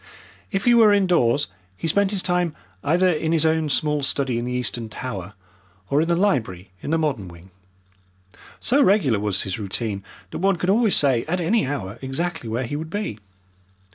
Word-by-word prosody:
If 195 0 -2
he 240 - +6
were 225 -3 +6
indoors 165 -9 +3 0.3
he 165 - -3
spent 200 +5 +3
his 195 -2 -1
time 180 -3 0 0.3
either 175 +5 +3
in 160 -2 0
his 160 -1 +2
own 160 -1 +1
small 150 +1 +1
study 135 -3 +1
in 120 - -4
the 125 - -3
Eastern 120 -2 -2
Tower, 105 -5 -6 0.6
or 145 +2 +3
in 165 - 0
the 170 - +2
library 115 - -1
in - - -5
the 165 - +2
modern 140 - -1
wing. 85 +2 -14 1.1
So 275 +4 +3
regular 175 - +3
was 105 -2 0
his 95 +2 -4
routine 100 0 -3 0.3
that - - -5
one 195 +1 +2
could 180 +2 0
always 220 -1 +3
say 130 -5 +3
at 175 +4 -1
any 180 - +1
hour 115 -6 -4
exactly 135 0 -3
where 115 +4 -1
he 145 - -4
would 160 +2 -5
be. 205 - -4
150 Hz, 190 wpm, -23 LUFS, 115-180 Hz, 1.1 s, he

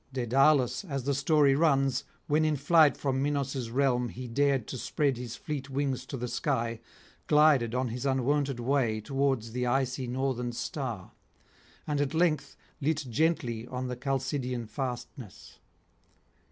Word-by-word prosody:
Daedalus, 130 - +3
as 140 -8 -4
the 140 +2 0
story 140 0 +3
runs, 135 -3 +2 0.2
when 155 +2 +2
in 155 -1 +2
flight 145 0 +4
from 135 -2 -1
Minos' 140 -4 -1
realm 125 -1 +1
he 125 +2 -7
dared 135 0 +1
to 130 - -5
spread 140 +1 0
his 120 0 -6
fleet 140 +1 -5
wings 135 -1 -2
to 135 - -5
the 125 0 -3
sky, 115 -4 -1 0.5
glided 150 -6 +4
on 125 -1 0
his 120 +2 -5
unwonted 135 0 0
way 120 -3 +1
towards 135 -1 -1
the 125 +1 -2
icy 130 0 0
northern 125 -1 -2
star, 120 - -4 0.7
and 145 -1 0
at 145 +2 -1
length 160 -4 +1 0.3
lit 155 0 0
gently 125 -5 0
on 125 0 -4
the 125 - -3
Chalcidian 130 -2 -2
fastness. 120 -1 -7
135 Hz, 145 wpm, -29 LUFS, 125-145 Hz, 0.7 s, flight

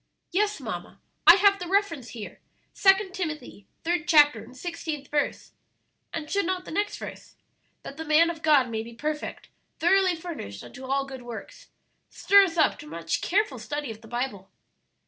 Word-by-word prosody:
"Yes, 415 +3 +1
mamma, - - -7 0.3
I 340 - +12
have 400 0 +4
the 355 - -5
reference 340 - 0
here; 220 -4 -9 0.3
Second 385 -1 +4
Timothy, 305 - -5 0.2
third 340 -1 -1
chapter, 295 -3 +5
and 255 - -14
sixteenth 315 -3 -5
verse. 290 -1 -1 0.6
And 315 -2 -5
should 400 +1 0
not 370 -1 -2
the - - -8
next 410 +5 -1
verse, - - -9 0.5
'That 275 - -9
the 320 - -5
man 320 +2 +4
of 325 -2 -10
God 295 -5 +4
may 220 -1 -2
be 230 +1 -10
perfect, 300 +4 -4 0.3
thoroughly 370 +2 +3
furnished 320 - -7
unto 260 +1 -10
all 275 +1 0
good 265 -2 -9
works,' 240 - -9 0.4
stir 400 0 +5
us 340 -2 -5
up 310 - +3
to - - -10
much 165 +1 -3
careful 420 +4 0
study 290 -4 -4
of 220 0 -11
the 225 - -14
Bible?" 240 -5 -4
310 Hz, 175 wpm, -26 LUFS, 260-365 Hz, 0.6 s, I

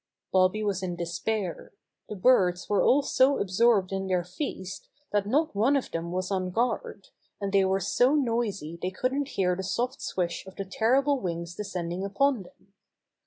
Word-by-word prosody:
Bobby 185 +3 +3
was 200 -3 -1
in 180 -2 -3
despair. 180 +2 -3 0.4
The 210 - -5
birds 185 -4 +3
were 205 - +2
all 285 +2 +4
so 270 0 +3
absorbed 200 0 +2
in 195 0 -2
their 180 -2 +1
feast 185 - -6 0.2
that 205 -1 +1
not 300 +8 +1
one 235 +8 +3
of 275 - -1
them 165 +1 -3
was 185 +1 -2
on 185 -1 -1
guard, 230 -1 -2 0.3
and 200 -1 -3
they 195 -1 +5
were 190 +1 +1
so 245 +8 +3
noisy 225 - -1
they 185 - -1
couldn't 260 +8 -1
hear 180 -2 +2
the 190 - -4
soft 245 +8 -2
swish 175 -2 -2
of 190 - -11
the 195 - -4
terrible 265 +8 +2
wings 170 -3 -4
descending 180 -2 -4
upon 240 +5 +1
them. 195 +2 -18
195 Hz, 175 wpm, -27 LUFS, 185-240 Hz, 0.4 s, they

